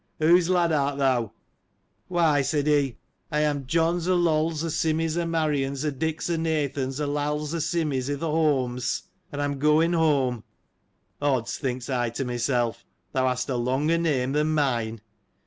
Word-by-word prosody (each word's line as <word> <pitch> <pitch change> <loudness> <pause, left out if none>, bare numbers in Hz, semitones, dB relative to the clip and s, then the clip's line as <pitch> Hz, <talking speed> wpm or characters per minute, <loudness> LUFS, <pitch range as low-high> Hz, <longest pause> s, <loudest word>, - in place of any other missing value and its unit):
" - - -46
Whose 170 +2 +4
lad 175 -2 +3
art 140 -2 +1
thou 130 -5 +1 0.4
?" - - -45
Why, 165 -5 +3
said 145 +1 0
he, 140 -6 +2 0.3
I 150 0 +1
am 145 -3 -1
John's 170 +3 +1
o' 185 - +3
Loll's 160 -2 +1
o' 165 - -2
Simmy's 160 0 0
o' 170 -1 -1
Marian's, 150 -4 -1
o' 150 - +1
Dick's 160 +3 -2
o' 170 -1 0
Nathan's 145 -4 -1
o' 150 - 0
Lall's 150 +1 -2
o' 170 - -1
Simmy's, 150 -5 -1
i'th' 145 -1 -3
Holmes; 145 -6 0 0.3
and 145 - -5
I 145 - +1
am 140 -1 -3
going 155 +4 +3
home.' 140 -8 +1 0.8
Odds! 125 -5 0
thinks 125 -2 -3
I 125 -3 0
to 120 +4 -4
myself, 120 -1 -1 0.3
thou 130 0 +1
hast 125 0 -1
a 130 - 0
longer 135 +7 +1
name 135 -6 0
than 150 +2 +1
mine. 115 -7 0
145 Hz, 175 wpm, -25 LUFS, 130-160 Hz, 0.8 s, Whose